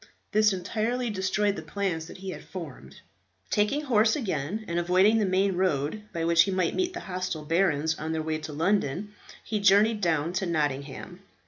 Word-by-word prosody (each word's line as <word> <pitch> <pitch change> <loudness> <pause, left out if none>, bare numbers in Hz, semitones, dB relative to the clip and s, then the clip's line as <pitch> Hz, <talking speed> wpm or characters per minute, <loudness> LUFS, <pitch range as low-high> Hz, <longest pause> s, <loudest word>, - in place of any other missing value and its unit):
This 215 0 +4
entirely 220 +6 -2
destroyed 195 +1 0
the - - -5
plans 180 -6 -3
that - - -10
he 190 0 -6
had - - -8
formed. 140 - -9 0.5
Taking 210 +8 +2
horse 225 -6 +3
again, 200 - -3
and 170 0 -1
avoiding 185 +6 +4
the 210 - +2
main 190 +1 +2
road, 175 0 0
by 165 -1 -2
which 170 0 +5
he 195 - +2
might 185 -3 0
meet 365 -1 -1
the - - -5
hostile 180 -4 -4
barons 160 -2 +2
on 160 +1 -3
their 160 -1 -1
way 155 0 -2
to 155 - -7
London, 185 +3 0 0.3
he 215 -2 -2
journeyed 205 +2 +4
down 165 -2 +1
to 190 0 -1
Nottingham. 150 +2 -3
185 Hz, 185 wpm, -27 LUFS, 160-210 Hz, 0.5 s, which